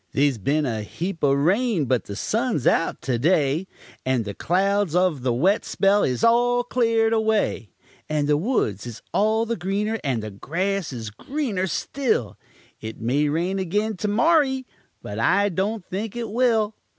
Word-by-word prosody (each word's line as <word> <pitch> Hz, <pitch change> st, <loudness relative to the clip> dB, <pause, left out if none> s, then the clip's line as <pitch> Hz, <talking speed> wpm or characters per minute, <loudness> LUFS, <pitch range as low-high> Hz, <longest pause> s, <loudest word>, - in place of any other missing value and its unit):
They's 140 Hz, -4 st, +2 dB
been 145 Hz, +9 st, +1 dB
a 115 Hz, -4 st, -2 dB
heap 170 Hz, -, -5 dB
o' 140 Hz, -, +4 dB
rain, 180 Hz, -, +2 dB
but 125 Hz, -3 st, 0 dB
the 100 Hz, -, -6 dB
sun's 220 Hz, -, -1 dB
out 165 Hz, -, +1 dB
to 125 Hz, -3 st, -1 dB
day, 155 Hz, +3 st, +2 dB, 0.4 s
And 130 Hz, -4 st, 0 dB
the 100 Hz, -, -5 dB
clouds 195 Hz, -, +1 dB
of 180 Hz, -6 st, +2 dB
the 125 Hz, 0 st, 0 dB
wet 185 Hz, -, +2 dB
spell 200 Hz, +1 st, +2 dB
is 125 Hz, -2 st, -1 dB
all 245 Hz, +1 st, +4 dB
cleared 230 Hz, -2 st, +1 dB
away, 220 Hz, -, 0 dB, 0.4 s
And 150 Hz, -1 st, 0 dB
the 150 Hz, -, +3 dB
woods 145 Hz, -, -1 dB
is 115 Hz, -1 st, -9 dB
all 220 Hz, +2 st, +2 dB
the 235 Hz, +1 st, -2 dB
greener, 210 Hz, +3 st, -2 dB
and 125 Hz, -7 st, -1 dB
the 110 Hz, -, -6 dB
grass 180 Hz, -, -2 dB
is 115 Hz, -4 st, -6 dB
greener 215 Hz, -, -3 dB
still; 205 Hz, -, -1 dB, 0.4 s
It 110 Hz, 0 st, -7 dB
may 140 Hz, +6 st, +1 dB
rain 175 Hz, +6 st, -1 dB
again 205 Hz, +4 st, -1 dB
to 210 Hz, -, -2 dB
morry, 265 Hz, +3 st, +2 dB, 0.4 s
but 105 Hz, +2 st, -6 dB
I 200 Hz, -, +3 dB
don't 195 Hz, +2 st, -2 dB
think 205 Hz, +3 st, -5 dB
it 235 Hz, -3 st, -4 dB
will. 225 Hz, -3 st, +2 dB
185 Hz, 170 wpm, -23 LUFS, 135-220 Hz, 0.4 s, o